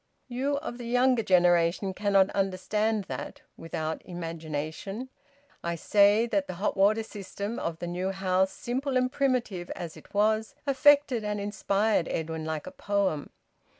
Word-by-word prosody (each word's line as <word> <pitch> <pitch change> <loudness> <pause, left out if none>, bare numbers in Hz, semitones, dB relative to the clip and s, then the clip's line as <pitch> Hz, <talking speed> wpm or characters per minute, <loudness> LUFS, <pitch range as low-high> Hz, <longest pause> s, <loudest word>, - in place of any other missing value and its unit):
You 265 +3 -1
of 280 -5 -6
the 240 - -6
younger 250 0 +3
generation 175 0 +3
cannot 195 0 +3
understand 200 +3 0
that - - -7
without 160 -1 -4
imagination. 165 - -5 0.5
I 170 0 -1
say 205 +5 +4
that 285 +5 0
the 185 - -5
hot 195 +4 -1
water 205 +3 +3
system 205 +1 -6
of 165 -1 -3
the 175 - -5
new 180 +2 -2
house, 190 0 +1
simple 260 +2 -2
and 255 0 +1
primitive 250 -11 0
as 170 -3 -6
it - - -15
was, 215 +5 +1
affected 280 -3 +4
and 210 0 -2
inspired 200 -1 +1
Edwin 160 0 -3
like 155 -1 -3
a - - -7
poem. 200 -8 -1
200 Hz, 150 wpm, -28 LUFS, 175-235 Hz, 0.5 s, say